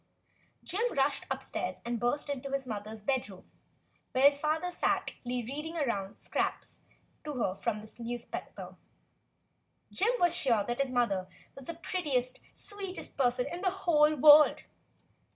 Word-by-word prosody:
Jim 460 +6 0
rushed 275 +1 +1
upstairs 265 -8 -2
and 235 -1 -2
burst 245 +6 0
into 275 -1 -4
his 275 -1 -1
mother's 215 -2 -6
bedroom, 210 -7 -2 0.7
where 260 - +2
his 280 0 +6
father 315 +4 0
sat - - 0 0.2
reading 275 +7 -3
aloud 200 -10 -2
scraps - - -3 0.4
to 300 - -5
her 235 -8 0
from 215 +1 -2
the 215 - -13
newspaper. 235 0 -6 1.1
Jim 440 +6 +2
was 350 -1 +3
sure 230 -6 +2
that 240 +4 -3
his 275 - 0
mother 215 -7 0 0.2
was 275 - -11
the 335 - -5
prettiest, 295 -7 -1 0.2
sweetest 395 -2 -7
person 250 -2 +2
in 350 - -5
the 385 - +2 0.2
whole 305 -2 +5
world. 300 +1 +7
270 Hz, 140 wpm, -31 LUFS, 235-305 Hz, 1.1 s, world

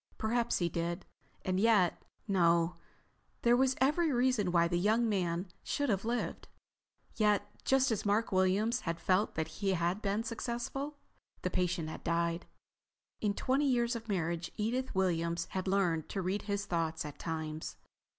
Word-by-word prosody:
Perhaps 235 +2 +1
he 175 - +1
did. 170 +2 -3 0.4
And 185 0 +1
yet—No, 180 -4 +2 0.7
there 240 0 +6
was 260 +1 +3
every 300 +5 +3
reason 245 -7 +2
why 170 -1 +4
the 175 0 0
young 220 +5 +3
man 180 -3 0
should 285 -2 -1
have 195 -3 +1
lived. 235 +1 -2 0.7
Yet, 210 -2 +3 0.2
just 270 -1 +3
as 220 - 0
Mark 210 +2 +1
Williams 195 +5 +2
had 165 0 -3
felt 190 +3 +1
that 160 0 -1
he 195 -1 +1
had 175 +3 0
been 205 +2 0
successful, 245 +5 -4 0.5
the - - 0
patient 175 -3 0
had 155 - -7
died. 170 0 0 0.7
In 205 -2 0
twenty 275 +6 +1
years 240 -1 +2
of 230 -1 -7
marriage, 170 -3 -1
Edith 240 +4 -1
Williams 170 -2 +1
had 190 0 -3
learned 180 -5 +1
to 195 - -2
read 190 +3 -1
his 200 0 -1
thoughts 165 -4 -1
at 150 - -8
times. 160 -1 -4
195 Hz, 155 wpm, -33 LUFS, 170-230 Hz, 0.7 s, there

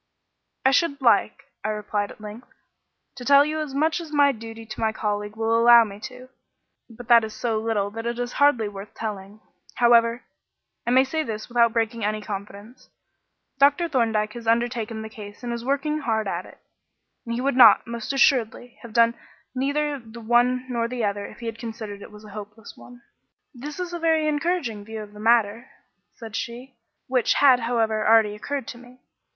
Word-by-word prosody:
"I 265 - +6
should 285 -1 +1
like," 230 -5 +2 0.2
I 215 - -1
replied 210 -1 -2
at - - -13
length, 215 +3 -10 0.7
"to 250 - -8
tell 280 +2 +6
you 310 +1 -3
as 295 -3 -5
much 315 +4 +1
as 320 -2 -10
my 285 -1 +4
duty 225 -2 -9
to 215 0 -9
my 220 -1 +1
colleague 210 -1 -3
will 225 0 0
allow 235 0 +7
me 205 -2 -8
to; 255 0 -13 0.6
but 235 +1 -12
that 235 -1 +6
is 220 -1 -6
so 225 -3 -1
little 215 -3 -1
that 225 +2 -5
it 235 0 -3
is 245 0 -4
hardly 245 -7 +4
worth 200 0 -10
telling. 210 -1 -6 0.3
However, 235 0 +4 0.6
I - - +2
may 260 +2 +5
say 315 +4 -2
this 220 -7 -5
without 235 -1 +3
breaking 230 0 -1
any 215 +1 -1
confidence: 205 +3 -9 0.7
Dr. 285 +5 +4
Thorndyke 225 -7 0
has 235 -1 -9
undertaken 230 -1 0
the - - -6
case 210 0 -11
and 240 -1 -3
is 235 0 -5
working 285 +4 -1
hard 220 -7 -1
at 180 -1 -4
it, - - -16 0.7
and 235 - -2
he 245 - -2
would, 275 0 0 0.3
most 235 0 -5
assuredly, 245 -3 +1
have 235 -3 -11
done 230 0 +4 0.4
neither 285 +2 -1
the 230 -1 -12
one 240 +2 +2
nor 235 -2 -1
the 245 -1 -4
other 200 0 -3
if - - -14
he - - -7
had 225 0 -5
considered 220 -3 -7
it - - -11
a 210 0 -13
hopeless 210 +1 -10
one." 245 -1 -15 0.5
"That 290 +6 -8
is 355 -1 -4
a 345 - -4
very 320 -2 +2
encouraging 295 - -1
view 220 +1 -7
of 210 0 -14
the 210 - -12
matter," 225 +1 +2 0.5
said 225 -2 -9
she, 245 +3 -6 0.3
"which, 250 -2 +1
had, 265 -3 +5
however, 225 -2 0
already 220 -2 +5
occurred 275 +6 -5
to 240 - -9
me. 250 +1 -17
235 Hz, 190 wpm, -24 LUFS, 215-255 Hz, 0.7 s, allow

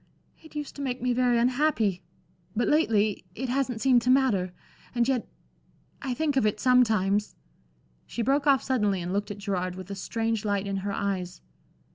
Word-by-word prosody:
"It 315 -1 -16
used 295 -2 -5
to - - -5
make 260 -2 -2
me 250 0 0
very 245 -1 +2
unhappy 240 - +1 0.5
but 240 - +1
lately 220 -9 +2
it 260 +2 -3
hasn't 255 -3 -1
seemed 255 -3 +4
to 245 - -1
matter. 245 -9 +3 0.4
And 240 0 +2
yet 260 -4 0 0.7
I 260 -3 -2
think 300 0 0
of 265 - +3
it 210 0 -1
sometimes" 215 -5 +3 0.7
She 235 - -3
broke 280 +4 +1
off 270 -4 +4
suddenly 210 -7 +1
and 175 +1 -4
looked 205 +1 -1
at 205 - -6
Gerard 185 -3 -2
with 185 +1 -8
a - - -3
strange 225 +2 -2
light 205 -2 0
in 195 -1 -2
her 200 +1 -3
eyes. 190 -3 -3
230 Hz, 180 wpm, -27 LUFS, 200-260 Hz, 0.7 s, seemed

